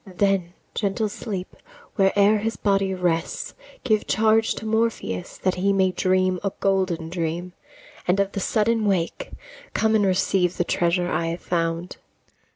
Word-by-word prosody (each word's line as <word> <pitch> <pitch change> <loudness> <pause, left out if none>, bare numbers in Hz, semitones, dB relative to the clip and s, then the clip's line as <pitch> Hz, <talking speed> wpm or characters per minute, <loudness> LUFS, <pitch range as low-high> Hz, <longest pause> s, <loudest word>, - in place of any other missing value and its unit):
Then, 195 -3 +1 0.2
gentle 210 +1 -1
Sleep, 200 -3 -6 0.4
where'er 200 +2 +4
his 225 +2 -2
body 195 -2 +1
rests, 175 -3 -1 0.3
Give 215 -3 +1
charge 220 +1 +3
to 220 - -7
Morpheus 220 - -1
that 185 - 0
he 190 +2 +1
may 190 -1 +3
dream 185 0 +1
A 195 - 0
golden 185 -4 0
dream, 170 +1 -3 0.5
and 180 +2 +2
of 200 0 +1
the 200 - -3
sudden 220 +2 +1
wake, 190 - -1 0.5
Come 220 0 +2
and 210 -2 +3
receive 185 -1 +1
the - - +2
treasure 175 +1 0
I 165 - 0
have 170 +1 -4
found. 165 0 -2
190 Hz, 150 wpm, -24 LUFS, 175-205 Hz, 0.5 s, where'er